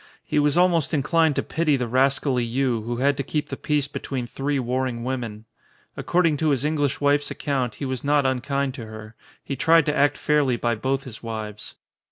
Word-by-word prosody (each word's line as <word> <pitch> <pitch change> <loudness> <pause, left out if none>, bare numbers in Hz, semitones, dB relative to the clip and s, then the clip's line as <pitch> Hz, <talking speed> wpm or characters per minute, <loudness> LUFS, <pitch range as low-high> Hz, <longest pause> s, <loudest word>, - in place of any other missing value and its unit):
He - - +1
was 145 +2 +2
almost 175 -4 +3
inclined 155 +2 +2
to - - 0
pity 160 -3 +1
the 125 -2 -2
ras 130 +3 +3
cally 125 -4 0
Yii 120 -1 0
who 120 0 -3
had 140 +3 +2
to - - 0
keep 150 +2 -3
the - - -3
peace 150 -2 0
between 130 -2 -4
three 140 +4 -2
warring 125 -1 -2
women. 120 -4 -4 0.5
According 170 -4 +1
to 155 +1 +1
his 140 -1 +1
English 145 -3 0
wife's 145 0 +2
account 130 -6 -2
he 140 - -5
was 130 -2 -3
not 145 -1 +2
unkind 135 +1 0
to 120 -5 -8
her. 110 0 -10 0.3
He 140 - -4
tried 160 +3 +4
to 150 - 0
act 145 +1 +3
fairly 145 -5 +2
by 120 0 0
both 130 +5 -1
his 125 -5 -10
wives. 110 -2 -6
135 Hz, 205 wpm, -24 LUFS, 120-145 Hz, 0.5 s, tried